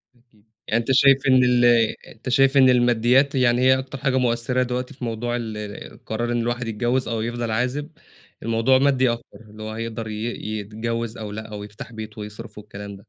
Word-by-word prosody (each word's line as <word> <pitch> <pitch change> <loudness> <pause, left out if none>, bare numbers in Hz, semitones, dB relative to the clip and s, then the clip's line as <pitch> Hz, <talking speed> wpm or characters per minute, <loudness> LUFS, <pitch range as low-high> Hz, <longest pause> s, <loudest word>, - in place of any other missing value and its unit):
أكيد، 115 -3 -29 0.2
يعني 115 - +2
أنت 120 - -2
شايف 135 +1 +6
إن 130 -1 +5
ال 125 -1 +4 0.4
أنت 120 +3 -8
شايف 135 +2 +4
إن 130 -1 +7
الماديات 125 +3 +3
يعني 125 -2 +3
هي 130 0 +5
أكتر 130 +1 -7
حاجة 130 0 0
مؤثرة 125 +1 +1
دلوقتي 125 0 -4
في 125 - -11
موضوع 120 +1 -2
ال 105 -2 -7
قرار 120 +2 -2
إن 120 - 0
الواحد 120 0 -2
يتجوّز 120 +3 0
أو 115 -1 -2
يفضل 120 0 -3
عازب، 125 +6 -1 0.5
الموضوع 115 +3 +3
مادي 130 -2 +3
أكتر 115 - -8
اللي 110 +1 -10
هو 110 - -5
هيقدر 115 0 -5
ي 110 0 -5 0.4
يتجوّز 115 +2 -4
أو 105 -2 -6
لأ، 110 +1 -6
أو 105 -1 -6
يفتح 105 +2 -10
بيت 110 -1 -8
ويصرف 105 +1 -9
والكلام 100 -1 -9
ده. 95 - -16
120 Hz, 195 wpm, -23 LUFS, 110-125 Hz, 0.5 s, إن